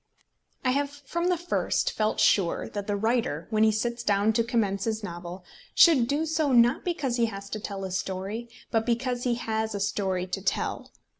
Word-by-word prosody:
I 255 - +4
have 280 +2 0
from 290 +5 -3
the 360 - +2
first 350 +2 0
felt 215 0 -1
sure 185 -5 +3
that 205 0 -5
the 205 - 0
writer, 220 -7 0
when 215 0 +3
he 220 - +5
sits 235 +2 -2
down 205 0 +2
to 230 - +2
commence 210 -5 0
his 220 -1 -2
novel, 175 0 -7 0.3
should 280 -9 +6
do 290 +4 0
so, 315 -2 0
not 240 0 +4
because 290 -9 -1
he 235 -1 +3
has 200 -2 -8
to 215 - -3
tell 200 -2 -5
a 190 - -4
story, 195 +5 -4 0.2
but 225 -1 +2
because 245 +1 -1
he 245 -1 +2
has 220 -2 -2
a - - -2
story 190 -2 -1
to 185 +1 -4
tell. - - -2
220 Hz, 200 wpm, -27 LUFS, 200-245 Hz, 0.3 s, should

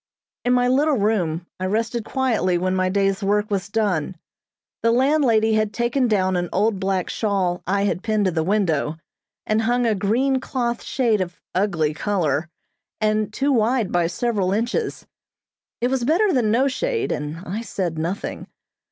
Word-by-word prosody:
In 245 - +3
my 245 0 +3
little 280 +3 +3
room 180 -6 0
I 185 - -2
rested 225 +3 -1
quietly 225 -10 +1
when 185 +1 0
my 185 0 +1
day's 195 +1 +1
work 210 +1 0
was 195 -1 -1
done. 195 -6 0 0.7
The 230 - +3
landlady 240 -3 +3
had 215 -1 +1
taken 240 +2 +1
down 190 -4 +1
an 175 -1 -1
old 205 +1 +1
black 190 -2 -1
shawl 195 -5 -1
I 200 +2 +1
had 200 -2 0
pinned 215 -1 0
to 185 - +2
the 160 -1 0
window, 165 -6 0 0.5
and 215 +1 +1
hung 240 +2 +1
a 225 - +3
green 240 +7 +1
cloth 240 -2 -2
shade 230 -6 +1
of 175 -2 -5
ugly 175 -6 +1
color, 160 -5 -1 0.5
and 215 -1 +1
too 275 +6 0
wide 235 -3 +1
by 175 -1 +2
several 195 0 0
inches. 240 - -2 0.8
It 245 - +2
was 265 -2 0
better 360 - +3
than 240 -6 +2
no 250 +5 +3
shade, 450 - -1
and 150 +2 -3
I 200 +6 -4
said 180 -8 -3
nothing. 175 +5 -4
210 Hz, 170 wpm, -22 LUFS, 185-240 Hz, 0.8 s, In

